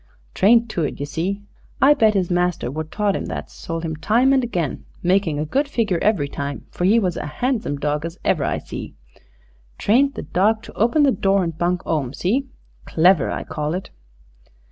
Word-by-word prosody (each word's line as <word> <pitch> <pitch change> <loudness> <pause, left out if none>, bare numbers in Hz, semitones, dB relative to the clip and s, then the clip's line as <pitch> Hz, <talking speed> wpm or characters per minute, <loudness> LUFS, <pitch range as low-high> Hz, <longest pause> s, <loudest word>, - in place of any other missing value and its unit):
Trained 230 +4 +4
to 170 - -2
it, 145 - -3
ye 145 - -2
see. 190 +7 -3 0.4
I 280 +2 +7
bet 220 -7 +3
his 185 -2 0
master 175 -6 0
wot 155 +2 -5
taught 205 -2 0
'im - - -3
that's - - -6
sold 165 -2 -5
him 160 -1 -3
time 235 - +3
and 265 -1 +3
again, 175 - -2 0.2
makin' 180 -4 +2
a 150 - -1
good 275 - 0
figure 220 -10 0
every 195 -10 +2
time, 140 0 -5
for 175 - -2
'e 210 +5 +5
was 185 -6 0
a 150 - -5
'andsome 235 - 0
dawg 150 +1 -1
as 165 +2 -6
ever - - +2
I - - 0
see. - - -8 0.8
Trained 270 +6 +3
the - - -5
dawg 205 +8 +1
to - - -11
open 235 +8 +2
the 280 - +5
door 195 -4 +2
and 165 -2 -3
bunk 175 +2 -1
'ome. 145 -5 -1
See? 255 +10 0 0.4
Clever, 170 -2 +4
I - - -3
call 150 +2 -3
it." 185 - -6
185 Hz, 200 wpm, -21 LUFS, 160-220 Hz, 0.8 s, I